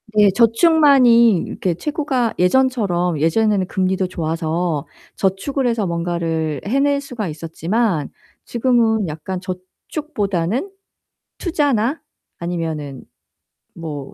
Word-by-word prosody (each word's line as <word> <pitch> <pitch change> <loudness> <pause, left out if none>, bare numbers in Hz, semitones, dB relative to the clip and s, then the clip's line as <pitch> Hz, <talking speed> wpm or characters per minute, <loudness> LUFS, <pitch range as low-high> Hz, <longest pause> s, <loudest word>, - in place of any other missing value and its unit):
네. 205 -2 +6
저축만이 240 - +5
이렇게 180 -3 -2
최고가 275 - -1
예전처럼 180 - +2
예전에는 190 +4 +2
금리도 190 0 0
좋아서 165 -2 -2 0.3
저축을 225 +8 -1
해서 230 -3 0
뭔가를 170 -3 -2
해낼 280 +6 +2
수가 250 -7 -5
있었지만 165 - -1 0.3
지금은 230 -4 +1
약간 160 +4 -5
저축보다는 195 - -3 0.7
투자나 290 - 0 0.4
아니면은 160 -5 -4 0.7
뭐 150 -5 -7
195 Hz, 250 characters per minute, -19 LUFS, 170-245 Hz, 0.7 s, 네